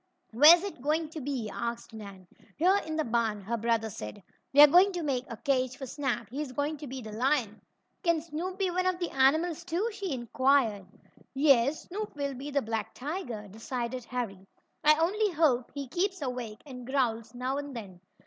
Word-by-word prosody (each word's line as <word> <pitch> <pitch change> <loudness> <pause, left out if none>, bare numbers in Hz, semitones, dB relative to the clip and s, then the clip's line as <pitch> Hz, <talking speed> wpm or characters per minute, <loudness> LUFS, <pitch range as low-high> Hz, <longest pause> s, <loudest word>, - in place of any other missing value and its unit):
"Where's 305 - +8
it 400 -10 -6
going 310 +3 0
to 315 -1 -7
be?" 260 -5 -3
asked 235 0 -4
Nan. 200 -4 -10 0.3
"Here 370 +5 +4
in 315 - -3
the 315 - +1
barn," 225 -3 0
her 230 +5 -2
brother 225 -1 0
said. 105 - -8 0.3
"We're 290 +2 +10
going 360 +7 +6
to 350 -2 -3
make 265 -4 -1
a 230 - -6
cage 255 -2 0
for 270 - -6
Snap 260 -4 -2
he's 280 0 -4
going 290 +3 -1
to 295 0 -8
be 260 -1 -6
the 215 - -8
lion." 235 -2 0 0.4
"Can 335 -4 +2
Snoop 335 +4 -5
be 385 -2 0
one 365 +1 0
of 370 -1 +1
the 350 -1 -3
animals, 315 +6 +2
too?" 360 +6 -1
she 400 -4 -4
inquired. 245 -4 +1 0.5
"Yes, 275 0 +4
Snoop 415 +1 -6
will 280 -1 -2
be 270 +3 -7
the 280 -1 0
black 220 -1 -3
tiger," 255 - -5
decided 240 +4 -4
Harry. 200 -7 -5 0.4
"I 305 0 +6
only 405 +6 +2
hope 260 -6 +2
he 280 -1 -4
keeps 375 +7 -1
awake, 245 -5 -5
and 250 -3 -9
growls 245 -4 -1
now 255 +2 -2
and 285 -2 -7
then. 190 -6 -9
270 Hz, 190 wpm, -29 LUFS, 235-315 Hz, 0.5 s, We're